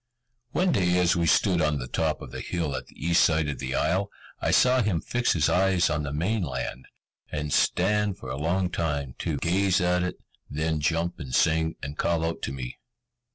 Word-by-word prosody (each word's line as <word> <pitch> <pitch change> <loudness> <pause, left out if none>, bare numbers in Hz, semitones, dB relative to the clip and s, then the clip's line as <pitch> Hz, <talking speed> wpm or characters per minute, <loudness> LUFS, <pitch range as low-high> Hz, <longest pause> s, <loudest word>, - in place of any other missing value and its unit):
One 180 +7 +1
day 90 - +2
as 90 0 +3
we 85 -1 +1
stood 90 +2 +3
on 75 -1 +1
the 65 -2 -5
top 80 +2 -1
of - - -10
the - - -6
hill 80 -6 -2
at - - -6
the - - -19
east 85 0 +4
side 80 -2 +2
of 75 - -4
the 65 -1 -3
isle, 95 +3 +1 0.3
I - - -1
saw 125 0 +4
him 100 -7 +1
fix 120 +8 0
his 75 -4 +2
eyes 90 -2 +2
on 75 0 0
the 70 -2 -4
main 95 +9 0
land, 65 -4 -4 0.4
and 75 -1 -3
stand 105 +1 +2
for 65 - -7
a - - -3
long 90 +5 0
time 70 -7 -2
to, - - -2
gaze 95 +2 +2
at 90 0 +2
it; 90 0 -2 0.3
then 80 +1 -1
jump 85 +4 -1
and 65 -5 -4
sing, 80 0 +2
and 70 +2 -6
call 85 -1 +1
out 80 - -3
to - - -5
me. 65 -2 -6
85 Hz, 210 wpm, -26 LUFS, 75-90 Hz, 0.4 s, east